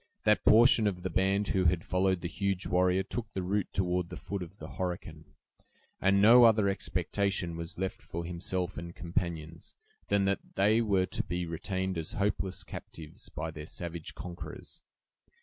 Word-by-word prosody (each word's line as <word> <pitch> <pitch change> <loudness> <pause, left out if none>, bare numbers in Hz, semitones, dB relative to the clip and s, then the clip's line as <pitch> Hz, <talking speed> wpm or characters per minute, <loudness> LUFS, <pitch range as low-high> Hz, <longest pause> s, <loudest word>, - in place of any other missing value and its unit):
That 105 0 +3
portion 115 -1 +6
of 90 -3 -2
the 95 - -2
band 95 +3 +1
who 95 -2 +2
had 85 0 +2
followed 95 0 +1
the 85 - -2
huge 100 +1 -2
warrior 90 +1 +2
took 110 +2 -5
the 95 - -2
route 100 +2 -1
toward 90 -2 0
the - - -7
foot 100 -1 -5
of 90 +3 -8
the - - -9
Horican, 85 -4 -5 0.7
and 100 +1 +3
no 115 +4 +8
other 110 -3 +5
expectation 95 -2 -1
was 85 0 -6
left 95 +1 -3
for 85 +1 -5
himself 90 +1 -3
and 85 0 -8
companions, 85 -3 -4 0.3
than 100 -1 +2
that 100 0 +1 0.2
they 105 +4 +4
were 100 -4 +2
to - - -2
be 90 0 -3
retained 95 +2 -3
as 80 - -3
hopeless 100 -2 -1
captives 80 -2 -9
by 80 +1 -4
their 75 -1 -8
savage 85 -2 -6
conquerors. 90 -1 -8
95 Hz, 170 wpm, -30 LUFS, 85-100 Hz, 0.7 s, no